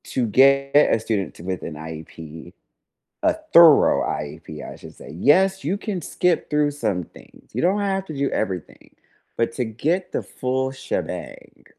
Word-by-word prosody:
To 125 - -1
get 140 +4 +4
a 145 -6 +5
student 110 -3 -3
with 90 0 -4
an 80 - -6
IEP, 80 +1 -10 0.7
a - - +4 0.2
thorough 170 -3 +7
IEP, 75 +1 -6
I - - -10
should - - -13
say, - - -12
yes, 190 - +3
you 185 +7 -1
can 200 -4 -4
skip 175 +2 0
through 150 0 +2
some 105 -11 -2
things. - - -19
You - - -2
don't 190 +4 +2
have 195 -1 -1
to 155 - -7
do 140 0 0
everything, 95 -5 -5 0.4
but 115 0 +1
to 125 - -1
get 155 - -2
the - - -2
full 130 +1 -2
shebang, 135 0 -6
130 Hz, 165 wpm, -22 LUFS, -, 0.7 s, thorough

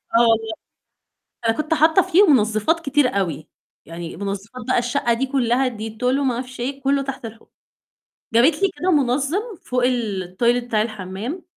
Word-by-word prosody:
آه - - +6
والله. 225 -1 +2 0.9
أنا 225 - +3
كنت 310 +1 -1
حاطة 320 +3 +5
فيهم 355 -4 +5
منظفات 220 +7 +1
كتير 290 -3 +2
أوي، 160 -5 -3 0.4
يعني 165 0 -8
منظفات 200 +5 -5
بقى - - +2
الشقة 240 0 0
دي 245 +4 0
كلّها 260 -1 +1
Dettol 220 +2 -7
وما 260 +1 +2
أعرفش 250 +1 -6
إيه، 270 +3 -4
كلّه 275 +1 +1
تحت 270 -3 -6
الحوض. 225 0 -11 0.9
جابت 290 +9 +4
لي 395 - +3
كده 370 - +1
منظم 280 +3 +1 0.2
فوق 250 -1 0
التويلت 235 0 0
بتاع 220 -3 +1
الحمام، 215 - -5
245 Hz, 155 wpm, -21 LUFS, 220-280 Hz, 0.9 s, آه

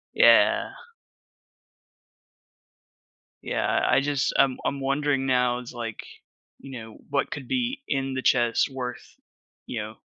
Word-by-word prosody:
Yeah. - - +5 2.7
Yeah, - - 0
I 135 - +4
just 140 -1 0
I'm 135 -2 +3
I'm 140 - -1
wondering 140 0 0
now, 125 -1 +2
it's, 125 0 -10
like, 115 -2 -6 0.5
you 135 -3 -8
know, 110 -1 -11
what 140 - 0
could 135 -4 -6
be 255 - -1
in 135 -1 -1
the 130 - -2
chest 120 -1 +2
worth, 125 -2 -7 0.5
you 115 -3 -3
know, 110 +1 -7
130 Hz, 125 wpm, -25 LUFS, 120-140 Hz, 2.7 s, Yeah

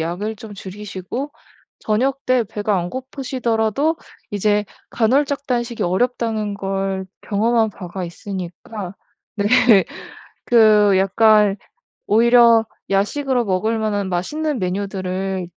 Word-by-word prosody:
양을 185 +7 -3
좀 210 0 -10
줄이시고 200 +7 -6 0.5
저녁때 255 +2 +1
배가 210 -2 -1
안 175 0 -3
고프시더라도 260 +1 -1 0.3
이제 205 +1 +1 0.3
간헐적 280 +5 +1
단식이 240 -2 -2
어렵다는 215 +1 0
걸 195 -1 -2 0.2
경험한 220 +1 +1
바가 185 -1 -7
있으니까 185 +2 -7 0.4
네 205 -1 0 1.0
그 215 -4 +5
약간 210 +1 +4 0.5
오히려 230 0 +5 0.2
야식으로 245 +6 +1
먹을 215 +3 0
만한 205 -3 -1
맛있는 290 - -2
메뉴들을 190 -1 -3
210 Hz, 240 characters per minute, -20 LUFS, 195-235 Hz, 1.0 s, 그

